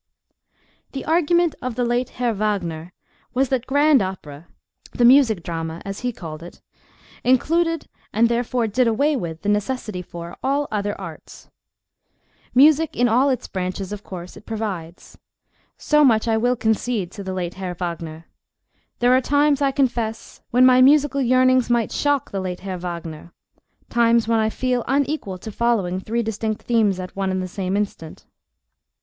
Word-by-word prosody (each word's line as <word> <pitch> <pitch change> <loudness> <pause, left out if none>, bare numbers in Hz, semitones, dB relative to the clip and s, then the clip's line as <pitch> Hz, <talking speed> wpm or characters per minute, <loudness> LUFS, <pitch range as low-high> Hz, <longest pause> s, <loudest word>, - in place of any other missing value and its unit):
THE 270 - -5
argument 340 +1 +2
of 255 -2 -4
the 245 0 0
late 240 +1 0
Herr 240 -2 0
Wagner 180 -6 -2 0.4
was 265 0 +2
that 255 -2 -1
grand 285 -1 +4
opera—the 175 +5 -5
music 240 -8 +5
drama, 165 -1 -4
as 195 0 -5
he 250 0 -2
called 160 -7 -8
it—included, 315 - -2 0.2
and 230 +3 +3
therefore 240 0 0
did 235 +3 +1
away 280 +7 +2
with 170 -8 -5
the 205 - 0
necessity 210 -2 -2
for—all 180 +13 -3
other 205 -1 -2
arts. 170 -5 -11 1.0
Music 305 +3 +5
in 245 - +3
all 250 +5 +3
its 255 - -2
branches, 185 +1 -4
of 210 0 -6
course, 180 -1 -9
it - - -15
provides: 195 -7 -6 0.6
so 300 -1 +3
much 230 -5 +3
I 225 - +2
will 245 +3 +2
concede 220 -4 -1
to 200 - -8
the 190 -1 -4
late 180 -1 -3
Herr 185 -2 -5
Wagner. 165 -2 -6 0.8
There 245 +1 +5
are 260 - +3
times, 285 +1 +2
I 280 - +3
confess, 240 -5 -2
when 250 +2 +5
my 255 0 +6
musical 280 0 +4
yearnings 255 0 +3
might 235 -2 +1
shock 285 -2 0
the 195 - -3
late 180 -1 -5
Herr 190 -1 -5
Wagner—times 175 +7 -3
when 230 -1 +2
I 220 0 +2
feel 250 +1 -1
unequal 275 -7 -1
to 215 +4 -8
following 205 -6 0
three 230 +4 -2
distinct 220 0 -3
themes 215 -5 +2
at 185 0 -7
one 195 -1 -1
and 185 0 -1
the - - -4
same 190 +1 -2
instant. 195 -6 -5
225 Hz, 155 wpm, -22 LUFS, 185-255 Hz, 1.0 s, my